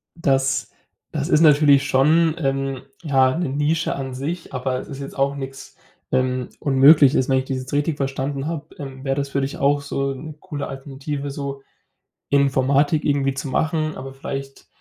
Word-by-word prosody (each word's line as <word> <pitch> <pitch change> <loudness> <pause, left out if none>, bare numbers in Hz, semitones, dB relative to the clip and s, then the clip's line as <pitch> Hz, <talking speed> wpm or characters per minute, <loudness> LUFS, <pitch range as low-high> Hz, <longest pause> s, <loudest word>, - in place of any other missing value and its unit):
Das 135 -4 +1 0.4
das - - -2
ist 155 - +4
natürlich 145 -3 +6
schon, 155 +5 +4
ähm, 135 -2 -1 0.2
ja, 135 -2 +3
'ne 175 - -1
Nische 150 +4 0
an 135 -2 -5
sich, 160 +7 -5
aber 130 0 -2
es - - -9
ist 140 - -7
jetzt 140 - -7
auch 140 +1 +1
nix, 135 -1 -8 0.3
ähm, 130 -1 0
Unmögliches. 140 0 +5
Wenn 130 - +3
ich 130 - -1
das 135 0 -2
jetzt 130 +1 -7
richtig 145 +1 0
verstanden 135 +1 -2
habe, 160 -2 -6
ähm, 135 -2 -8
wäre 135 -1 0
das 140 0 -2
für 140 - -1
dich 135 +1 -3
auch 145 +1 +2
so 140 -1 -2
'ne 150 +4 -8
coole 150 -6 -5
Alternative, 140 +1 -5
so 140 -1 -5 0.7
Informatik 140 +2 +2
irgendwie 140 -2 +1
zu 135 0 -5
machen, 155 +2 0
aber 135 +1 -7
vielleicht, 135 0 -7
140 Hz, 175 wpm, -22 LUFS, 135-145 Hz, 0.7 s, natürlich